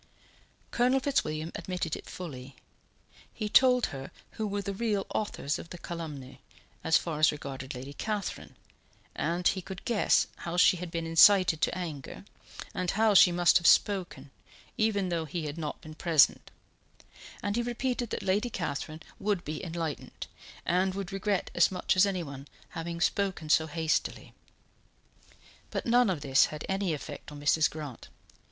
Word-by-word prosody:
Colonel 250 Hz, +2 st, +3 dB
Fitzwilliam 160 Hz, -, -1 dB
admitted 180 Hz, -4 st, -3 dB
it -, -, -10 dB
fully. 135 Hz, -7 st, -8 dB, 0.8 s
He 215 Hz, -, -4 dB
told 250 Hz, +2 st, +5 dB
her 135 Hz, -1 st, -7 dB, 0.2 s
who 220 Hz, -, -3 dB
were 200 Hz, 0 st, -3 dB
the 200 Hz, -, -3 dB
real 205 Hz, -1 st, -1 dB
authors 155 Hz, -8 st, -2 dB
of 165 Hz, -, -10 dB
the 175 Hz, -, -8 dB
calumny, 155 Hz, -7 st, -7 dB, 0.4 s
as 165 Hz, -, +5 dB
far 160 Hz, -3 st, -4 dB
as 155 Hz, -, +5 dB
regarded 135 Hz, -2 st, -7 dB
Lady 135 Hz, +3 st, -7 dB
Catherine, 210 Hz, +4 st, -4 dB, 0.6 s
and 175 Hz, +2 st, 0 dB
he 190 Hz, -, +1 dB
could 190 Hz, +1 st, -9 dB
guess 230 Hz, -4 st, +3 dB
how 170 Hz, 0 st, -5 dB
she 180 Hz, 0 st, +6 dB
had 180 Hz, 0 st, -6 dB
been 165 Hz, 0 st, -3 dB
incited 165 Hz, 0 st, +6 dB
to -, -, +1 dB
anger, 155 Hz, -7 st, -6 dB, 0.5 s
and 180 Hz, -1 st, -2 dB
how 215 Hz, +2 st, +3 dB
she 185 Hz, -2 st, +8 dB
must 175 Hz, 0 st, +4 dB
have 170 Hz, -, +1 dB
spoken, 175 Hz, -9 st, +2 dB, 0.4 s
even 205 Hz, -4 st, +1 dB
though 165 Hz, -2 st, -1 dB
he 160 Hz, +1 st, -4 dB
had 150 Hz, +2 st, -5 dB
not 150 Hz, -2 st, -4 dB
been 155 Hz, -3 st, -10 dB
present, 160 Hz, -2 st, +3 dB, 0.9 s
and 205 Hz, 0 st, -1 dB
he 240 Hz, -, +1 dB
repeated 240 Hz, 0 st, -2 dB
that -, -, -4 dB
Lady 205 Hz, +6 st, +1 dB
Catherine 155 Hz, -4 st, -4 dB, 0.2 s
would 200 Hz, -3 st, -1 dB
be 155 Hz, +1 st, -5 dB
enlightened, 165 Hz, -3 st, -5 dB, 0.4 s
and 185 Hz, +2 st, +1 dB
would 195 Hz, -1 st, -5 dB
regret 195 Hz, 0 st, -1 dB
as 175 Hz, -, +4 dB
much 185 Hz, 0 st, 0 dB
as 185 Hz, +2 st, +5 dB
anyone 145 Hz, -8 st, -5 dB, 0.2 s
having 170 Hz, +1 st, -5 dB
spoken 190 Hz, -5 st, 0 dB
so 160 Hz, 0 st, +4 dB
hastily; 160 Hz, 0 st, -2 dB, 1.4 s
but -, -, -4 dB
none 245 Hz, -1 st, +4 dB
of 175 Hz, -6 st, -1 dB
this 135 Hz, -1 st, +4 dB
had 150 Hz, -1 st, -7 dB
any 195 Hz, -2 st, 0 dB
effect 145 Hz, +1 st, -9 dB
on 145 Hz, -, -9 dB
Mrs. 150 Hz, +1 st, +3 dB
Grant. 150 Hz, -6 st, -8 dB
175 Hz, 160 wpm, -29 LUFS, 155-200 Hz, 1.4 s, she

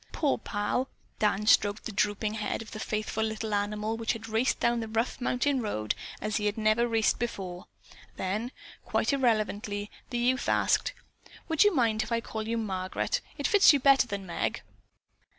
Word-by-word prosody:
"Poor 290 Hz, -5 st, 0 dB
Pal!" 205 Hz, +5 st, -1 dB, 0.3 s
Dan 210 Hz, -1 st, +1 dB
stroked 205 Hz, 0 st, +3 dB
the -, -, -3 dB
drooping 210 Hz, +1 st, 0 dB
head 220 Hz, +1 st, -3 dB
of 220 Hz, -, -14 dB
the 215 Hz, -, -7 dB
faithful 215 Hz, 0 st, -2 dB
little 220 Hz, 0 st, -3 dB
animal 210 Hz, +2 st, -1 dB
which 230 Hz, 0 st, 0 dB
had 230 Hz, -1 st, -8 dB
raced 225 Hz, +3 st, +1 dB
down 235 Hz, 0 st, +2 dB
the 225 Hz, -, -4 dB
rough 225 Hz, +4 st, -2 dB
mountain 255 Hz, +2 st, +1 dB
road 110 Hz, -, -1 dB, 0.3 s
as 215 Hz, 0 st, -1 dB
he 210 Hz, -1 st, 0 dB
had 205 Hz, -, -1 dB
never 220 Hz, +2 st, +3 dB
raced 225 Hz, -3 st, +2 dB
before. 190 Hz, -6 st, -4 dB, 0.5 s
Then, 210 Hz, +6 st, -2 dB, 0.3 s
quite -, -, 0 dB
irrelevantly, 215 Hz, -5 st, 0 dB, 0.2 s
the 245 Hz, -, -2 dB
youth 250 Hz, +2 st, +1 dB
asked: -, -, +2 dB, 0.6 s
"Would 320 Hz, -2 st, +5 dB
you 415 Hz, -3 st, +3 dB
mind 225 Hz, -4 st, +2 dB
if 220 Hz, -, -5 dB
I 230 Hz, -, +2 dB
call 220 Hz, -1 st, -5 dB
you 230 Hz, +1 st, -1 dB
Margaret? 190 Hz, -4 st, -2 dB, 0.2 s
It -, -, -4 dB
fits 400 Hz, -6 st, +7 dB
you 285 Hz, -, +3 dB
better 270 Hz, -1 st, +5 dB
than 200 Hz, -3 st, -4 dB
Meg." 175 Hz, -, -2 dB
220 Hz, 180 wpm, -29 LUFS, 210-240 Hz, 0.6 s, fits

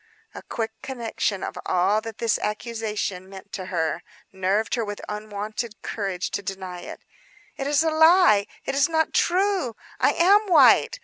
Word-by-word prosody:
A -, -, -8 dB
quick 225 Hz, -1 st, -4 dB
conception 230 Hz, -6 st, -3 dB
of -, -, -5 dB
all 190 Hz, +4 st, +2 dB
that 225 Hz, -1 st, -8 dB
this 230 Hz, -2 st, 0 dB
accusation 210 Hz, -4 st, -3 dB
meant 195 Hz, +1 st, -10 dB
for 190 Hz, -3 st, -6 dB
her 170 Hz, -2 st, -2 dB, 0.3 s
nerved 195 Hz, +3 st, 0 dB
her 235 Hz, -, 0 dB
with 205 Hz, -1 st, -5 dB
unwonted 210 Hz, +1 st, -5 dB
courage 195 Hz, -4 st, -3 dB
to -, -, -2 dB
deny 185 Hz, -2 st, -6 dB
it. -, -, -9 dB, 0.5 s
"It 275 Hz, -, -4 dB
is 295 Hz, +2 st, +3 dB
a 320 Hz, -, +1 dB
lie; 320 Hz, -, +5 dB, 0.2 s
it 270 Hz, -, -2 dB
is 280 Hz, +3 st, +3 dB
not 320 Hz, -1 st, +1 dB
true, 365 Hz, -, +1 dB, 0.2 s
I -, -, +3 dB
am 405 Hz, +5 st, +4 dB
white! 380 Hz, +6 st, +5 dB
215 Hz, 165 wpm, -24 LUFS, 195-280 Hz, 0.5 s, lie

